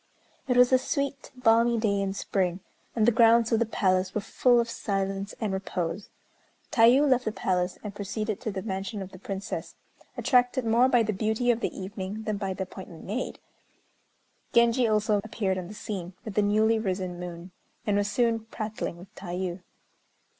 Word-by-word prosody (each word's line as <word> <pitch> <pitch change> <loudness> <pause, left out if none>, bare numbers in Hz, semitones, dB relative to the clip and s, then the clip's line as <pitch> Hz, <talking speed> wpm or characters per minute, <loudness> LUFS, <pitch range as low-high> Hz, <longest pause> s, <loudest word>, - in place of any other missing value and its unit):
It 250 -1 +2
was 250 +1 +6
a 255 - +6
sweet 280 0 -2
balmy 235 -1 +4
day 200 -3 +1
in 195 0 -2
spring, 185 -2 -1 0.3
and 220 -2 +3
the 240 - +6
grounds 230 0 +5
of 225 - +3
the 235 - +1
palace 185 -3 +1
were 210 - 0
full 245 +4 +3
of 235 - +1
silence 195 -2 -3
and 210 -3 -1
repose. 190 0 -3 0.6
Tayû 250 +5 +6
left 255 -2 +3
the 215 - 0
palace, 180 -3 -1
and 210 -1 -5
proceeded 210 +1 -3
to 230 - -2
the 190 -1 -5
mansion 195 0 -4
of 190 - -10
the 185 - -12
Princess, 195 +2 -5 0.4
attracted 250 -1 +2
more 235 +3 +4
by 245 -3 +4
the 215 0 -1
beauty 220 +5 +1
of 230 - 0
the - - -1
evening 195 +2 -5
than 215 -2 -2
by 195 -1 -3
the 190 - -2
appointment 185 -3 -10
made. 225 +6 -3 1.2
Genji 235 +1 +4
also 215 -1 +2
appeared 200 -4 -1
on 180 - -6
the 210 - -9
scene, 185 -4 -5
with 215 - -5
the 210 - +3
newly 215 +2 +3
risen 185 -4 -3
moon, 175 0 -7 0.3
and 205 - +1
was 205 0 +1
soon 235 -2 +2
prattling 215 -5 -5
with 180 +2 -14
Tayû. 180 0 -4
210 Hz, 180 wpm, -27 LUFS, 190-230 Hz, 1.2 s, was